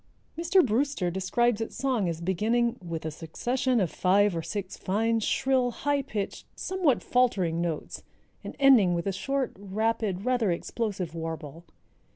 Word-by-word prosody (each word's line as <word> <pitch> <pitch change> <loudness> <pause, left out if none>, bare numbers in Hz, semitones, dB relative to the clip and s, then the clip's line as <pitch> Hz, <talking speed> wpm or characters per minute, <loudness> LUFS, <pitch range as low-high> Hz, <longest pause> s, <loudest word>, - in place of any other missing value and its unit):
Mr. 345 +3 +3
Brewster 240 -5 0
describes 225 +5 +1
its 225 - -4
song 245 -8 0
as 165 0 -4
beginning 225 +7 +1
"with 165 -2 -5
a 160 - -2
succession 240 - -1
of 185 -6 0
five 195 +1 +3
or 165 - -1
six 195 +2 -5
fine, 225 +4 0
shrill, 255 +3 +1
high 285 +4 0
pitched, 215 -7 -5
somewhat 365 -9 0
faltering 190 -10 +1
notes, 165 -3 -3 0.4
and - - -7
ending 240 -11 +6
with 170 - -2
a 195 - -1
short, 270 +6 -2
rapid, 205 -1 -1
rather 245 -5 +2
explosive 190 -1 -3
warble. 165 -1 -6
210 Hz, 150 wpm, -27 LUFS, 175-250 Hz, 0.4 s, ending